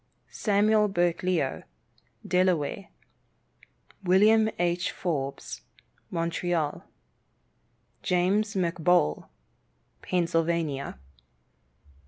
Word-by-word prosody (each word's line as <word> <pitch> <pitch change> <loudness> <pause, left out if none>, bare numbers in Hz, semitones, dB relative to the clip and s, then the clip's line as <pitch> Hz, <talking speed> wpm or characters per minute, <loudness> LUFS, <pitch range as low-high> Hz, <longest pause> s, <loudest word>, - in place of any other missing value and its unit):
Samuel 210 0 +2
Burkleo, 175 -4 0 0.7
Delaware. 180 0 +1 1.2
William 215 +4 +5
H. 175 +1 0
Forbes, 140 -6 -4 0.5
Montreal. 170 -2 -2 1.2
James 195 +4 +1
McBoal, 170 - +1 0.7
Pennsylvania. 165 - -1
175 Hz, 50 wpm, -27 LUFS, 165-190 Hz, 1.2 s, William